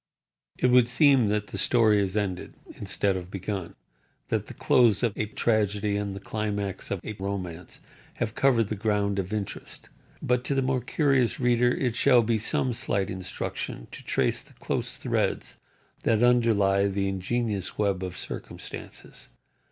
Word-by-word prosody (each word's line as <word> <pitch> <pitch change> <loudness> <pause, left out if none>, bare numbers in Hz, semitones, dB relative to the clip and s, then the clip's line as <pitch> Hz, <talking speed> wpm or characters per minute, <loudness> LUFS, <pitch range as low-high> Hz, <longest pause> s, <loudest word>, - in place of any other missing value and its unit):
It 125 - +2
would 125 -1 +6
seem 135 -2 +4
that 105 -1 -1
the 100 - -5
story 110 0 +4
is 100 0 0
ended, 95 -4 -3 0.2
instead 100 -2 -1
of 90 -1 -5
begun; 95 -2 -5 0.5
that - - -1
the - - -10
close 120 -3 +4
of 115 -4 +2 0.2
tragedy 105 -2 +1
and 100 -1 -2
the - - -6
climax 100 -1 -3
of 100 - -2
a 110 - -5
romance 90 -3 -5 0.3
have 110 -2 -2
covered 115 -6 +3
the 110 - -2
ground 100 -1 0
of 95 0 -3
interest; 105 -2 -5 0.3
but, 125 0 0
to 140 - 0
the 135 - +2
more 130 -1 0
curious 135 -3 +1
reader 120 -1 +3
it 125 -2 -1
shall 125 -2 +5
be 115 0 +1
some 120 +3 0
slight 100 -5 0
instruction 95 -9 -5
to - - -8
trace - - +1
the - - -18
close - - -3
threads - - -1 0.4
that 115 0 +2
underlie 105 -5 +4
the 100 0 -1
ingenuous 100 +1 -2
web 100 -3 +1
of 90 -2 -5
circumstances. - - -8
105 Hz, 160 wpm, -27 LUFS, 100-120 Hz, 0.5 s, would